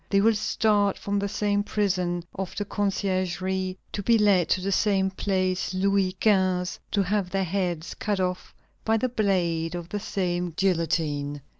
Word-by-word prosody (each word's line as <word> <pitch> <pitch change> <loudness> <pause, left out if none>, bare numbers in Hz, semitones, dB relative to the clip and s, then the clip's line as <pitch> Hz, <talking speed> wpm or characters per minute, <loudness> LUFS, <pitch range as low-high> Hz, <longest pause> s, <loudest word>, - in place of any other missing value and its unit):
They 200 - +3
will 225 +3 +4
start 210 -1 +1
from 200 0 -1
the 200 - -1
same 205 0 +1
prison 180 -4 -1
of 190 -2 -5
the 205 - -2
Conciergerie, 190 -2 -1
to 205 - -3
be 230 +3 +4
led 195 -6 +3
to - - +2
the 195 +2 -2
same 195 -1 +2
Place 185 -1 -1
Louis 195 -1 +1
XV., 185 -4 +2
to 200 - +1
have 195 -1 0
their 195 +1 0
heads 180 -2 -2
cut 205 -2 -2
off 180 -1 -3 0.3
by 225 0 +2
the 255 +3 0
blade 175 -7 0
of 175 -1 -6
the 205 - -3
same 180 -4 -2
guillotine. 155 -6 0
190 Hz, 165 wpm, -26 LUFS, 180-205 Hz, 0.3 s, will